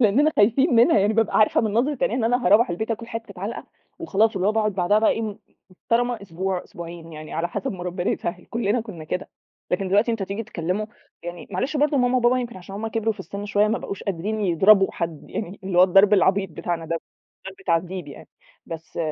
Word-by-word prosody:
لأننا 255 Hz, +7 st, +4 dB
خايفين 240 Hz, +7 st, +4 dB
منها، 230 Hz, -2 st, +5 dB
يعني 205 Hz, +2 st, +2 dB
بابقى 225 Hz, -1 st, +2 dB
عارفة 215 Hz, -, +4 dB
من 220 Hz, -3 st, -1 dB
نظرة 260 Hz, +5 st, +1 dB
عينيها 235 Hz, -, +1 dB
إن 235 Hz, -, 0 dB
أنا 245 Hz, 0 st, +1 dB
هاروَّح 215 Hz, +4 st, +5 dB
البيت 220 Hz, +7 st, -3 dB
هاكل 230 Hz, +1 st, -3 dB
حتة 225 Hz, -5 st, -7 dB
عَلْقَة، 210 Hz, +4 st, -5 dB, 0.3 s
وخلاص 225 Hz, -, +1 dB
اللي 190 Hz, +1 st, 0 dB
هو -, -, +2 dB
باقعد 215 Hz, -1 st, +1 dB
بعدها 195 Hz, +3 st, +3 dB
بقي 220 Hz, -, +4 dB
إيه 220 Hz, -3 st, -2 dB, 0.3 s
محترمة 235 Hz, +4 st, -1 dB
أسبوع، 185 Hz, 0 st, -3 dB
أسبوعين 170 Hz, -1 st, -9 dB
يعني 155 Hz, 0 st, -9 dB
على 170 Hz, +2 st, -1 dB
حسب 200 Hz, +2 st, -3 dB
ما 180 Hz, -2 st, -7 dB
ربنا 180 Hz, 0 st, -2 dB
يسهّل 180 Hz, +1 st, -3 dB
كلنا 230 Hz, 0 st, 0 dB
كنا 190 Hz, -9 st, -9 dB
كده، 180 Hz, -, -4 dB, 0.4 s
لكن 185 Hz, +1 st, 0 dB
دلوقتي 205 Hz, +5 st, +3 dB
أنت 225 Hz, -3 st, -2 dB
تيجي 200 Hz, +4 st, -3 dB
تكلّمُه 195 Hz, 0 st, -3 dB, 0.3 s
يعني 175 Hz, 0 st, -8 dB
معلش 260 Hz, -, -2 dB
برضه 290 Hz, 0 st, +2 dB
ماما 250 Hz, 0 st, +2 dB
وبابا 245 Hz, +1 st, +3 dB
يمكن 240 Hz, -4 st, -5 dB
عشان 185 Hz, +2 st, -10 dB
هُم 215 Hz, +2 st, -4 dB
كِبروا 225 Hz, 0 st, 0 dB
في -, -, -11 dB
السِنّ 200 Hz, +1 st, -6 dB
شوية، 205 Hz, +1 st, +2 dB
ما 225 Hz, -, 0 dB
بقوش 200 Hz, -, -6 dB
قادرين 200 Hz, +4 st, -3 dB
يضربوا 195 Hz, +2 st, +5 dB
حد، 165 Hz, -3 st, -5 dB
يعني 200 Hz, -2 st, -5 dB
اللي 185 Hz, -2 st, 0 dB
هو 180 Hz, -, +9 dB
الضرب 195 Hz, +3 st, +5 dB
العبيط 195 Hz, -1 st, +2 dB
بتاعنا 165 Hz, 0 st, -4 dB
دوَّة 165 Hz, +1 st, -1 dB, 0.4 s
مش -, -, -
ضرْب 190 Hz, -, -17 dB
تعذيب 175 Hz, -1 st, -1 dB
يعني، 140 Hz, -, -12 dB, 0.4 s
بس 165 Hz, 0 st, -8 dB
205 Hz, 215 wpm, -23 LUFS, 180-225 Hz, 0.4 s, هو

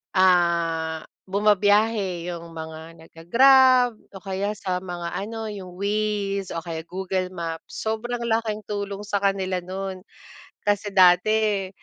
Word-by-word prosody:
ah, 170 Hz, -3 st, +2 dB, 0.3 s
bumabiyahe 205 Hz, -2 st, +2 dB
'yong 170 Hz, -1 st, -6 dB
mga 160 Hz, -1 st, -7 dB, 0.3 s
nagga-Grab 255 Hz, +8 st, +5 dB, 0.2 s
o -, -, -7 dB
kaya 195 Hz, +2 st, -2 dB
sa 185 Hz, -1 st, -2 dB
mga 175 Hz, -2 st, -5 dB
ano, 220 Hz, +2 st, -5 dB
'yong 185 Hz, -3 st, -8 dB
Waze 200 Hz, -1 st, -1 dB
o 165 Hz, -, -2 dB
kaya 165 Hz, -1 st, -5 dB
Google 185 Hz, 0 st, -2 dB
Maps. 165 Hz, -1 st, -6 dB
Sobrang 235 Hz, +2 st, -2 dB
laking 225 Hz, -2 st, -1 dB
tulong 200 Hz, -1 st, -4 dB
sa 205 Hz, 0 st, 0 dB
kanila 190 Hz, -2 st, 0 dB
no'n 190 Hz, +1 st, -5 dB, 0.7 s
kasi 205 Hz, 0 st, +1 dB
dati 195 Hz, +2 st, +4 dB
195 Hz, 120 wpm, -24 LUFS, 180-210 Hz, 0.7 s, nagga-Grab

